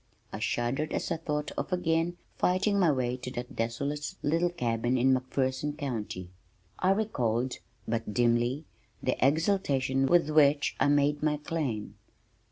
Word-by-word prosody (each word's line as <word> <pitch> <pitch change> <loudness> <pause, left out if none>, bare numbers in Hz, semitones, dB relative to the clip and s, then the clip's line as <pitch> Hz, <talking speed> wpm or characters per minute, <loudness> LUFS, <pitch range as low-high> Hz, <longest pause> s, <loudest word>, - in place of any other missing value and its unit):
I - - -4
shuddered 130 +6 -1
as - - -2
I 165 - +1
thought 150 -2 -3
of - - -4
again 175 -1 +1 0.2
fighting 195 +3 +2
my 175 -5 +5
way 125 -2 -1
to 125 - -6
that 125 +2 -6
desolate 140 +6 -2
little 165 +4 +2
cabin 120 -6 0
in 130 +2 +4
McPherson 130 +3 -1
County. 110 - -4 0.5
I 185 - +2
recalled 130 - 0 0.3
but 115 -1 -2
dimly 120 +5 +1 0.4
the - - +1
exultation 135 -4 +2
with 170 -1 +3
which 145 -1 +4
I - - +4
had 145 - +4
made 145 0 +2
my 150 -1 +1
claim. 145 -8 -3
140 Hz, 150 wpm, -29 LUFS, 125-160 Hz, 0.5 s, my